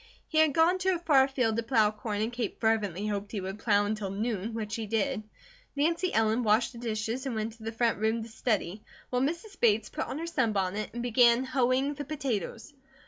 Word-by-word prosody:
He 315 - +1
had 315 -2 +4
gone 340 +3 +4
to 375 0 +2
a - - -1
far 290 -6 +4
field 250 -5 0
to - - +1
plow 225 -3 +3
corn 215 -1 -4
and 230 +2 -3
Kate 235 -4 -3
fervently 210 -4 0
hoped 205 -1 -3
he 210 - -3
would 190 +2 -5
plow 205 -2 +3
until 210 -1 -2
noon, 215 +1 -3
which 215 -2 -4
he 225 -2 -3
did. 215 -1 0 0.5
Nancy 335 +5 +1
Ellen 225 +2 +2
washed 220 +2 +2
the 235 - -11
dishes, 230 +3 -3
and 250 - -3
went 220 +1 -2
into 230 - -19
the 225 +1 -4
front 230 -2 0
room 220 +1 0
to - - -8
study, 215 -4 -2 0.3
while 250 0 +1
Mrs. 340 +9 -3
Bates 220 -2 +3
put 310 - -4
on - - -4
her 330 - -4
sunbonnet 215 - 0
and 240 - -3
began 240 0 +4
hoeing 260 +2 +1
the 290 0 -5
potatoes. 270 - -4
230 Hz, 215 wpm, -29 LUFS, 215-265 Hz, 0.5 s, had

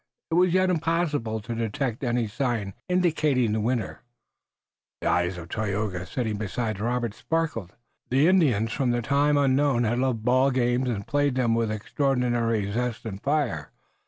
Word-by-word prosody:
It - - 0
was 180 +1 +4
yet 185 +1 +3
impossible 155 -9 0
to 115 - -5
detect 115 +2 -2
any 120 -1 +1
sign 110 -4 -2 0.2
indicating 155 -9 +2
the 110 0 0
winner. 120 +1 -2 1.0
The - - -2
eyes 90 +1 +1
of 85 -1 -8
Tayoga, 100 -4 -2
sitting 110 0 -2
beside 110 0 -3
Robert, 120 0 -1
sparkled. 115 - -2 0.3
The 135 +5 +4
Indians 130 - +3
from 120 -2 0
time 145 +4 +2
unknown 135 -2 +3
had 120 +2 0
loved 125 -4 -1
ball 130 +2 +4
games 125 0 +1
and 120 -4 0
had 100 - -8
played 145 -2 +1
them 120 -3 +2
with 115 -1 +1
extraordinary 115 -2 0
zest 120 +1 -2
and 100 -3 -6
fire. 135 - -1
120 Hz, 160 wpm, -26 LUFS, 110-140 Hz, 1.0 s, was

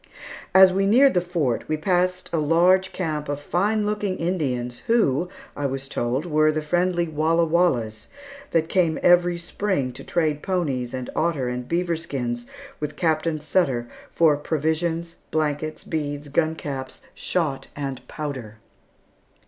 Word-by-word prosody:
As 190 -1 +8
we 195 +1 +2
neared 265 +6 +6
the 180 - +3
Fort 165 -9 -1
we 155 - +1
passed 180 +2 0
a 165 - +2
large 175 +5 +3
camp 155 -5 -3
of 145 0 -2
fine 205 +8 0
looking 205 -2 -1
Indians 130 -9 -2
who, 180 - +2 0.3
I 145 - -1
was 135 0 -4
told, 130 +3 -1
were 155 -2 +3
the 155 0 -2
friendly 175 +2 +1
Walla 160 +2 +2
Wallas, 125 -11 +1 0.4
that 160 -1 +1
came 170 -3 +2
every 175 0 +5
spring 175 -5 -2
to 125 - -10
trade 155 -4 0
ponies, 135 -10 -1
and 130 -1 -5
otter, 155 -6 0
and 125 0 -4
beaver 170 0 0
skins 125 -7 -4 0.3
with 150 - -4
Captain 160 -1 0
Sutter 140 -7 0 0.2
for 160 -3 +4
provisions, 160 +3 -1
blankets, 155 0 -1
beads, 145 -2 -4
gun 160 +2 +1
caps, 135 -4 -6
shot, 155 -7 -2
and 135 -3 -4
powder. 130 -8 -6
160 Hz, 145 wpm, -24 LUFS, 140-175 Hz, 0.4 s, As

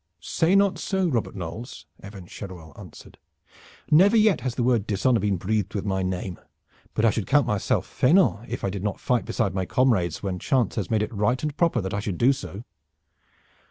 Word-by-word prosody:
"Say 165 - +1
not 200 -1 +3
so, 190 -2 0
Robert 120 -7 -2
Knolles," 95 +7 -7 0.2
Evan 100 -2 -10
Cheruel 85 -5 -10
answered. - - -13 0.7
"Never 195 +9 +6
yet 215 -2 +4
has 130 -2 -3
the 120 - -1
word 120 -4 +1
dishonor 115 +4 +2
been 100 -1 0
breathed 105 +3 -2
with 100 - -2
my 95 -2 -1
name, 95 -1 -3 0.6
but 110 - +2
I 115 - +5
should 105 -1 -3
count 145 -2 +4
myself 105 -5 0
faineant 130 - +2
if - - -5
I 95 - -1
did 100 -1 -5
not 105 -2 -2
fight 125 -2 0
beside 95 - -1
my 95 -1 -2
comrades 100 -11 +1
when 95 -2 -3
chance 125 -4 +1
has 100 -6 -3
made 110 -2 +1
it 105 - -5
right 105 +6 0
and 150 -2 -2
proper 165 -7 +1
that 95 0 -4
I 100 - -1
should 100 -4 -4
do 130 +4 +4
so." 115 -6 -8
110 Hz, 200 wpm, -25 LUFS, 95-130 Hz, 0.7 s, Never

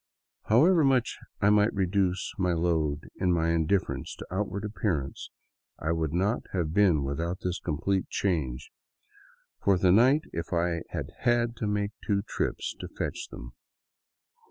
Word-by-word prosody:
However 160 - +5
much 130 -3 +2 0.2
I 100 - +5
might 105 +1 +3
reduce 95 -1 0
my 90 -2 +2
load 80 -3 0
in 90 - +1
my 85 -1 +2
indifference 85 +3 0
to - - -9
outward 100 +1 -2
appearance, 90 -10 -2 0.5
I 80 - -2
would 80 -2 -1
not 95 +7 +1
have 85 -4 -1
been 90 -7 +4
without 85 +6 -3
this 90 -1 -2
complete 90 +4 -1
change 70 -9 -2 0.9
for 100 -2 +4
the 90 0 +4
night 130 - +5
if 85 +2 -4
I 85 -1 0
had - - -5
had 120 -1 +2
to 110 - -2
make 105 0 0
two 100 -1 0
trips - - -3
to - - -6
fetch - - -4
them. - - -10
90 Hz, 150 wpm, -28 LUFS, 80-105 Hz, 0.9 s, However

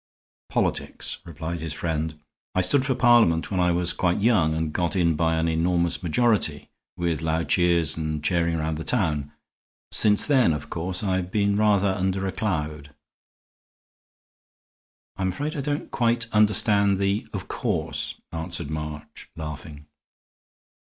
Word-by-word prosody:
"Politics," - - -2
replied 85 +1 -5
his 80 -1 -4
friend. 80 -1 -3 0.4
"I 95 - +3
stood 130 +9 +3
for 130 - +1
Parliament 115 -10 +4
when 95 - 0
I 90 0 +3
was 85 0 +1
quite 90 -1 0
a - - -3
young 105 -8 +3
man 80 - -2
and 80 -2 -2
got 85 +1 -1
in 85 -3 +3
by 80 +1 +1
an 80 +1 0
enormous 85 +1 +1
majority, 90 -5 +1 0.3
with 85 -3 -1
loud 80 +1 -1
cheers 85 -3 +2
and 80 -1 -3
chairing 85 -1 +1
round 80 0 -2
the - - -4
town. 75 - 0 0.6
Since 105 -1 +5
then, 130 - +3
of 75 0 -6
course, 90 +3 -3
I've 95 -2 -1
been 100 0 +1
rather 100 -2 +3
under 95 0 -1
a 95 - -1
cloud." 75 -8 -3 2.2
"I'm 95 -1 -1
afraid 145 +12 -3
I 145 - -2
don't 145 +1 -3
quite 115 -1 +1
understand 105 -2 +3
the 100 +2 -1
'of - - -5
course,'" - - -2
answered 85 -2 -4
March, 75 -1 -7
laughing. 75 -1 -8
85 Hz, 150 wpm, -24 LUFS, 80-100 Hz, 2.2 s, Since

